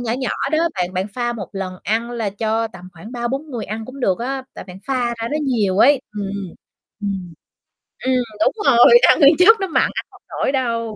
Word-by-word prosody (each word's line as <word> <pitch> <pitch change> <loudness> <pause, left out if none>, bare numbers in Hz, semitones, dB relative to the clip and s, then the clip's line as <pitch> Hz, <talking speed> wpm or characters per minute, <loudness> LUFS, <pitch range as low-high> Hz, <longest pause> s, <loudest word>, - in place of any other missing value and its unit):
nhỏ 235 -2 -2
nhỏ 260 +1 -2 0.2
đó 310 - +3 0.2
bạn 180 -1 -2
bạn 185 +2 -1
pha 240 -1 -1
một 205 -5 -7
lần 190 -2 -5
ăn 230 +3 -1
là 225 -4 -3
cho 225 +2 -1
tầm 185 -3 -12
khoảng 205 +8 -12
3-4 265 +5 -3
người 235 -4 -4
ăn 220 +2 -5
cũng 265 +3 -10
được 190 -6 +1
á. 265 +2 -3
Tại - - -8
bạn 185 0 -11
pha 255 -3 0
ra 230 - -2
nó 300 - 0
nhiều 210 -8 0
ấy. 280 +1 +5 0.2
Ừm, 200 -1 -3 0.7
ừm, 190 -4 -4 0.7
ừm, 260 - +2 0.3
đúng - - +2
rồi, 270 - +7
ăn - - +5
nguyên 290 +2 +7
chất 435 +4 +7
nó 385 - -1
mặn 325 - +2
ăn - - -3
hông - - -19
nổi - - -1
đâu. 230 -4 -2
235 Hz, 220 wpm, -20 LUFS, 200-265 Hz, 0.7 s, rồi